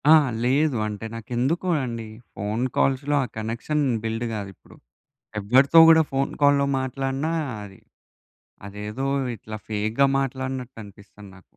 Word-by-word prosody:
ఆ! - - +10 0.3
లేదు. 140 +2 +2
అంటే 105 +1 -5
నాకెందుకో 125 +10 -2
అండి 115 -3 -5 0.3
ఫోన్ 105 +4 -2
కాల్స్‌‌లో 140 +2 +1
ఆ - - -2
కనెక్షన్ 115 +7 -2 0.2
బిల్డ్ 115 +1 -2
కాదు 100 -2 -4
ఇప్పుడు. - - -19 0.6
ఎవ్వరితో 130 +10 +5
కూడా 160 0 +7
ఫోన్ 135 0 0
కాల్‌లో 140 0 +4
మాట్లాడినా 135 +3 -2 0.3
అది, 95 -1 -13 0.9
అదేదో 105 +6 -4 0.3
ఇట్లా 110 +1 -8
ఫేక్‌గా 110 +5 +1
మాట్లాడినట్టనిపిస్తది 125 -7 -6
నాకు. 95 - -22
125 Hz, 120 wpm, -24 LUFS, 110-135 Hz, 0.9 s, ఆ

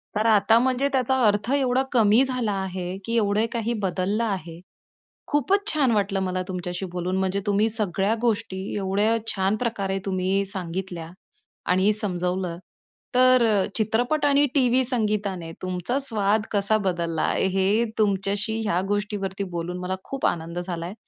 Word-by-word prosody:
तर 215 +1 +1
आता 215 0 +5
म्हणजे 260 +2 +1
त्याचा 265 0 +2
अर्थ 210 +2 +2
एवढा 260 -2 +2
कमी 225 0 +5
झाला 250 -5 -1
आहे 185 -1 -4
की 230 - -2
एवढे 210 0 +2
काही 235 0 -1
बदललं 195 +4 0
आहे. 175 -6 -4 0.7
खूपच 380 +8 +1
छान 275 -5 +2
वाटलं 200 -2 +1
मला 185 -1 -1
तुमच्याशी 180 0 -4
बोलून 180 +1 -2
म्हणजे 190 +1 0
तुम्ही 205 +2 +3
सगळ्या 210 -1 0
गोष्टी 220 -4 0 0.2
एवढ्या 205 +3 +1 0.2
छान 195 +1 +1
प्रकारे 200 -5 -2
तुम्ही 190 0 0
सांगितल्या 180 -3 -5 0.6
आणि 190 +3 +4
समजवलं 180 -4 -2 0.6
तर 255 -1 +6
अ, 205 -4 +2
चित्रपट 240 +8 +1
आणि 285 0 +4
टीव्ही 255 -1 +3
संगीताने 210 -8 -1
तुमचा 185 +7 -2
स्वाद 215 -4 +1
कसा 205 +1 +2
बदलला 170 -3 -1
आहे. - - +1
हे 195 +5 +2
तुमच्याशी 205 +1 0
ह्या 180 -3 +1
गोष्टीवरती 205 -1 -2
बोलून 170 +1 -3
मला 180 +1 -2
खूप 275 -1 -4
आनंद 170 +1 -1
झालाय. 175 0 -4
200 Hz, 145 wpm, -24 LUFS, 185-230 Hz, 0.7 s, तर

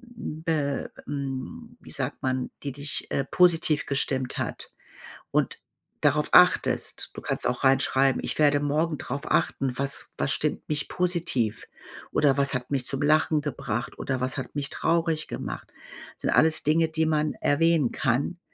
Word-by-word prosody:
hm, 155 -7 -6
be 145 -4 -1 0.2
ähm, 145 - -5
wie - - -13
sagt 135 0 -3
man, 130 -1 -1
die 140 - -3
dich, 140 +1 -3
äh, 140 - +1
positiv 165 -4 +3
gestimmt 135 -2 -1
hat - - -4 0.6
und - - 0 0.4
darauf - - +2
achtest. - - +4
Du - - -8
kannst - - -2
auch 125 +2 -2
reinschreiben: 135 0 +3
„Ich - - -3
werde 145 -1 +4
morgen 150 +2 0
drauf 135 +2 -4
achten: 135 -2 +1
Was 140 0 0
was 140 - 0
stimmt 150 - -1
mich 150 -1 -2
positiv? 170 - -1 0.4
Oder 145 -2 +3
was 140 0 +2
hat 125 +1 -4
mich 135 -3 0
zum 135 -1 -3
Lachen 155 0 +3
gebracht? 120 -5 -4
Oder 130 -1 -2
was 130 +2 -2
hat 135 - -6
mich 140 -1 0
traurig 165 -1 0
gemacht?“ - - -6 0.5
Sind - - -1
alles 160 0 +4
Dinge, 160 +2 +3
die 160 0 0
man 155 -1 +1
erwähnen 155 -3 +3
kann. 140 +6 -1
145 Hz, 160 wpm, -26 LUFS, 135-160 Hz, 0.6 s, achtest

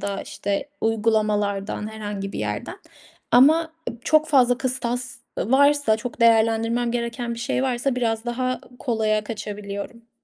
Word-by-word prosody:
da, 200 0 -3
işte, 200 +7 -3
uygulamalardan 210 -2 0
herhangi 205 -2 -5
bir - - -5
yerden. 105 -1 -3 0.6
Ama 315 +7 +5 0.2
ıb 235 0 -13
çok 310 0 +4
fazla 250 -5 +4
kıstas 250 -1 -2 0.2
varsa, 285 -2 +3
çok 235 +2 -7
değerlendirmem 230 +1 +3
gereken 235 0 -3
bir - - -9
şey 255 +2 -1
varsa 255 0 0
biraz 225 -2 0
daha 255 +1 -2 0.2
kolaya 215 -4 0
kaçabiliyorum. 210 +1 -6
230 Hz, 130 wpm, -23 LUFS, 215-250 Hz, 0.6 s, Ama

